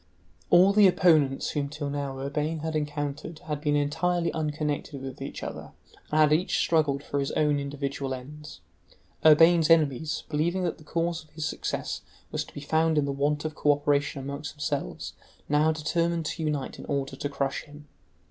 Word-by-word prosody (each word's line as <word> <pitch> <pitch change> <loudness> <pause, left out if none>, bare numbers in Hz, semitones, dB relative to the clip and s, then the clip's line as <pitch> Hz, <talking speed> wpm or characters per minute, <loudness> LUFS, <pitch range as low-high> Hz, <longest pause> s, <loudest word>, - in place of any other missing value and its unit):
All 185 +3 +6
the 205 -1 +7
opponents 155 -7 +3
whom 145 -2 -2
till 150 0 -5
now 140 -2 -3
Urbain 150 +3 -2
had 160 0 -3
encountered 145 +1 -3
had 150 -2 -3
been 150 -1 +1
entirely 170 +4 0
unconnected 150 -2 -2
with 135 -1 -7
each - - -6
other, - - -7 0.4
and 155 - +1
had 150 -1 +6
each 170 +4 +1
struggled 150 -4 +2
for 140 - -2
his 140 - -1
own 150 -1 +2
individual 140 -1 -4
ends. 150 +4 -10 0.6
Urbain's 165 +1 +6
enemies, 155 -2 +2
believing 170 +5 0
that 170 - -2
the - - -14
cause 165 +2 -2
of 155 - -24
his 155 -1 -5
success 155 - -3 0.3
was - - -1
to - - -16
be 145 - -6
found 160 +2 +2
in 145 - +3
the 140 - -1
want 145 +2 0
of 155 - -2
cooperation 145 -1 +1
among 140 +1 -4
themselves, 145 - -4 0.3
now 150 +2 +3
determined 165 +1 0
to 165 - -3
unite 150 -3 -2
in - - -8
order 135 -1 -2
to 145 - -3
crush 140 -1 -2
him. 150 0 -14
150 Hz, 175 wpm, -27 LUFS, 145-160 Hz, 0.6 s, the